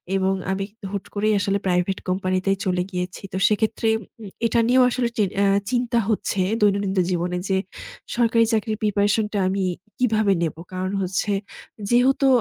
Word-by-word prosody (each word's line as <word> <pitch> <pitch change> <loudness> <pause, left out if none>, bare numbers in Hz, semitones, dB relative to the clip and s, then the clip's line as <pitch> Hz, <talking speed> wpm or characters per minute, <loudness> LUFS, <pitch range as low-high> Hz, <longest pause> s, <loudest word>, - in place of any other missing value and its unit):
এবং 190 0 +2 0.2
আমি 195 +1 -1
কিন্তু 215 -1 -10
হুট 200 - -3
করেই 215 +1 +2
আসলে 200 0 +1
প্রাইভেট 180 +1 +1
কোম্পানিতেই 185 +1 0
চলে 180 -1 +1
গিয়েছি। 180 -1 -4
তো 185 - -1
সেক্ষেত্রে 220 +1 0
উম 205 +1 -12 0.2
এটা 230 0 +2
নিয়েও 255 +1 +5
আসলে 245 -1 0
চিন 200 -3 +2
অ্যা 200 - +3 0.2
চিন্তা 245 -1 +1
হচ্ছে 200 -2 0 0.2
দৈনন্দিন 200 -1 +2 0.2
জীবনে 180 0 -1
যে 190 - +2 0.6
সরকারি 230 -1 +4
চাকরির 215 0 0
প্রিপারেশন 205 +1 +2
টা 205 - +1
আমি 195 0 -1 0.4
কিভাবে 220 -5 +3
নেব? 165 -2 -1 0.2
কারণ 185 +1 -2
হচ্ছে 190 +3 -1 0.6
যেহেতু 260 +3 +4
200 Hz, 160 wpm, -23 LUFS, 190-225 Hz, 0.6 s, নিয়েও